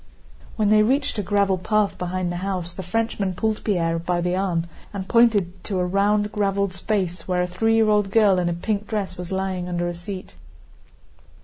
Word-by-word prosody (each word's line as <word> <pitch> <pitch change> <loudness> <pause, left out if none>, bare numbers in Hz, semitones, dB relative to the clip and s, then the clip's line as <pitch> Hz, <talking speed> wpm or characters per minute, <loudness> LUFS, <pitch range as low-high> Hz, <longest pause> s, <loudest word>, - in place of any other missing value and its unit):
When 215 -2 +1
they 215 0 +6
reached 260 +1 +1
a - - +2
gravel 200 -1 +1
path 210 +2 +1
behind 180 0 -2
the 175 - -3
house 180 -2 -3
the 190 - -6
Frenchman 195 0 -1
pulled 220 +3 -1
Pierre 165 -5 0
by 175 +1 -1
the 180 +1 0
arm 185 -3 0 0.3
and 195 -2 -5
pointed 205 -7 +3
to 195 - -2
a 180 - +1
round, 205 +3 +1
graveled 200 -2 0
space 185 -3 -2
where 180 -1 +1
a - - -1
three 225 +6 +1
year 225 -1 +4
old 210 -2 +2
girl 200 -3 +4
in 175 -1 0
a - - 0
pink 205 +4 -2
dress 210 -3 -3
was 180 0 -7
lying 190 -1 -2
under 175 0 -1
a 175 - -2
seat. 185 +2 -8
195 Hz, 200 wpm, -23 LUFS, 180-210 Hz, 0.3 s, they